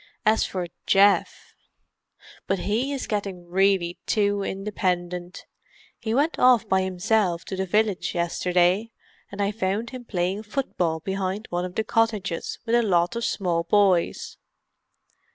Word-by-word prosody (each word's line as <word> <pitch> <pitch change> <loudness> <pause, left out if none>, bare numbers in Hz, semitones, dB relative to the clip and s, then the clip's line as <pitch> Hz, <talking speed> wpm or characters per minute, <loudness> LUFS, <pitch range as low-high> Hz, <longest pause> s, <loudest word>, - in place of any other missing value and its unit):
As 220 +1 +4
for 185 -2 -3 0.2
Geoff——! 200 +1 +3 0.9
But 195 - +1
he 225 +9 -1
is 275 -2 -3
getting 195 -4 -4
really 185 -1 +1
too 205 -1 +1
independent: 180 -3 -3 0.5
he 220 - -3
went 295 +5 +1
off 250 -4 +5
by 190 0 +2
himself 185 -1 0
to 190 - -5
the 190 0 -2
village 210 -1 0
yesterday, 180 +4 +1 0.4
and 200 0 -2
I 200 - 0
found 210 +2 -2
him 255 -2 -8
playing 185 0 -1
football 185 - -2
behind 195 +3 -3
one 175 +1 -1
of 180 - -8
the 220 - 0
cottages 215 -6 -1
with 230 - -1
a 240 - +5
lot 180 -1 +1
of 235 - -3
small 175 -6 0
boys." 190 -2 +1
195 Hz, 140 wpm, -25 LUFS, 180-215 Hz, 0.9 s, off